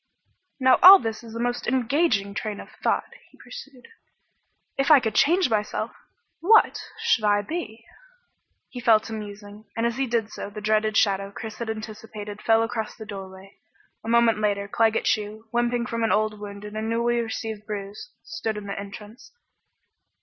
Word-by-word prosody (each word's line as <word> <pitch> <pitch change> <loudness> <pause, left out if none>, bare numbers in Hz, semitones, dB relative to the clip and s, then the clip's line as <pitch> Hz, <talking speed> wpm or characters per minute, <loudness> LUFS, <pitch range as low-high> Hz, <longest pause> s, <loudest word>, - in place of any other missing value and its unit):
"Now, 260 -1 +5
all 385 +2 +12
this 225 - -5
is 225 -1 -10
a - - -4
most 245 +1 -2
engaging 245 -5 +1
train 210 0 -4
of - - -10
thought," - - +1 0.3
he - - -23
pursued. 280 - -12 0.9
"If 275 +2 0
I 300 -3 +9
could 220 -4 -2
change 345 - +4
myself, 215 -3 -2 0.5
what 440 +6 +4 0.2
should 225 - +2
I 205 -1 +3
be?" 230 -6 -6 0.8
He 250 - -8
fell 230 -3 +5
to 225 - -8
musing, 205 0 -9
and 230 - +1
as 235 +1 -1
he 270 0 0
did 225 -2 -1
so - - -6
the 210 +1 -8
dreaded 215 0 +1
shadow 195 -1 +2
Chris 220 +2 -8
had 235 -1 -4
anticipated 215 -1 -7
fell 225 0 +3
across 225 -1 -4
the 220 - -9
doorway. 195 -1 -10 0.4
A 225 - -5
moment 235 -2 +4
later 200 -1 0
Claggett 225 +2 +1
Chew, 215 +1 -1
limping 240 0 +1
from 230 -1 -3
an 225 - +1
old 215 0 +1
wound 200 0 -8
and 210 0 -9
a 215 - -2
newly 235 +2 0
received 220 -2 -5
bruise, 205 - -6
stood 225 -11 -4
in 210 - -7
the 200 0 -5
entrance. 210 +5 -11
220 Hz, 175 wpm, -24 LUFS, 210-235 Hz, 0.9 s, all